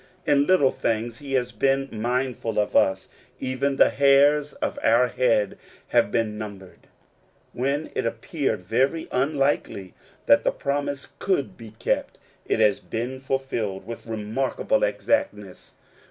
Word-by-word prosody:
In 140 0 +3
little 165 -8 +4
things 115 +1 -2
he 140 -2 -7
has 125 -2 0
been 135 +4 +1
mindful 120 0 -2
of 105 -1 0
us: 95 - +2 0.3
even 130 +2 -1
the - - +5
hairs 140 +1 +4
of - - -3
our 120 +2 +4
head 120 -5 +1 0.3
have 105 - +3
been 110 -2 -1
numbered. 100 -4 -9 0.7
When 140 +5 -2
it - - -1
appeared 125 - -2
very 130 - 0
unlikely 135 -8 0 0.3
that - - +5
the - - +3
promise 140 0 -3
could 185 -9 -1
be 110 -2 -12
kept, - - -1 0.3
it - - +1
has 105 -2 +3
been 120 +4 -4
fulfilled 125 -8 -3
with 115 +1 -8
remarkable 115 - -1
exactness. - - -1
125 Hz, 135 wpm, -24 LUFS, 110-140 Hz, 0.7 s, the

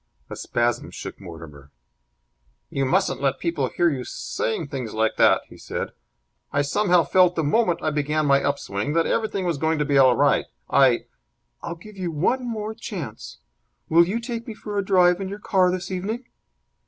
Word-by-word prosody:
A - - -4
spasm 120 0 -1
shook - - -8
Mortimer. 80 -6 -11 1.0
"You 135 -1 0
mustn't 130 - +1
let 135 -1 +1
people 155 -6 -1
hear 175 - +1
you 130 -3 -3
saying 125 +4 -3
things 125 -6 -5
like 110 0 +1
that!" - - +5
he - - -15
said. - - -4 0.6
"I 145 - +1
somehow 175 +3 +3
felt, 180 +3 +4
the 160 - 0
moment 175 +2 +1
I 155 - +1
began 150 +1 0
my 140 -1 +4
up 140 0 +1
swing, 100 +7 -3
that 165 0 +2
everything 210 -4 -1
was 170 -5 -1
going 160 +1 +1
to 150 - 0
be 140 -1 +3
all 130 -2 +6
right. - - +3 0.3
I 130 -3 +4 0.3
" - - -49
"I'll 170 - -5
give 205 +4 -14
you 180 -2 -2
one 245 - 0
more 215 -1 -4
chance. 155 - -7 0.5
Will 170 +1 +5
you 215 +5 -1
take 235 -1 -5
me 225 - -6
for 210 -1 -7
a 200 - +1
drive 180 -1 +4
in 190 - -3
your 200 - -5
car 190 -3 +2
this 185 +1 -3
evening?" 210 +7 -3
165 Hz, 190 wpm, -23 LUFS, 135-195 Hz, 1.0 s, all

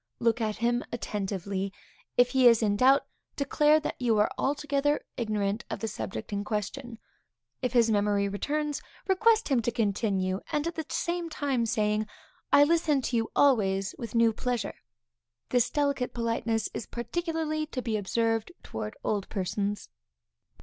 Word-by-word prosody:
Look 230 0 +1
at 215 -1 0
him 240 +1 0
attentively. 195 -3 -3 0.5
If 245 0 +5
he 260 -1 +5
is 230 -1 +5
in 205 -1 +2
doubt, 265 +6 +5 0.3
declare 300 +2 +3
that - - -4
you 230 -3 +2
are 210 - +3
altogether 290 +1 0
ignorant 215 -1 -1
of - - -3
the 225 - -2
subject 110 - -5
in 200 0 -1
question. 225 +4 -4 0.6
If 250 -2 -1
his 230 -2 +4
memory 205 -1 +2
returns, 295 +9 -2 0.3
request 435 +3 +3
him 260 -4 +3
to 230 - 0
continue, 195 -4 0
at 295 - +1
the 325 -1 -3
same 345 0 -2
time 270 -7 -1
saying; 215 0 +1 0.4
I 285 - +8
listen 305 -3 +2
to 245 - -1
you 225 -1 +1
always 195 -8 +3
with 235 -2 -6
new 230 -1 +4
pleasure. 245 +1 -2 0.8
This 245 -1 +3
delicate 280 -3 0
politeness 230 -2 0
is - - -5
particularly 310 +4 -2
to 255 -4 -5
be 225 -3 -1
observed 225 - 0
towards 105 -1 -6
old 205 -3 -1
persons. 200 +1 -2
235 Hz, 150 wpm, -28 LUFS, 210-280 Hz, 0.8 s, I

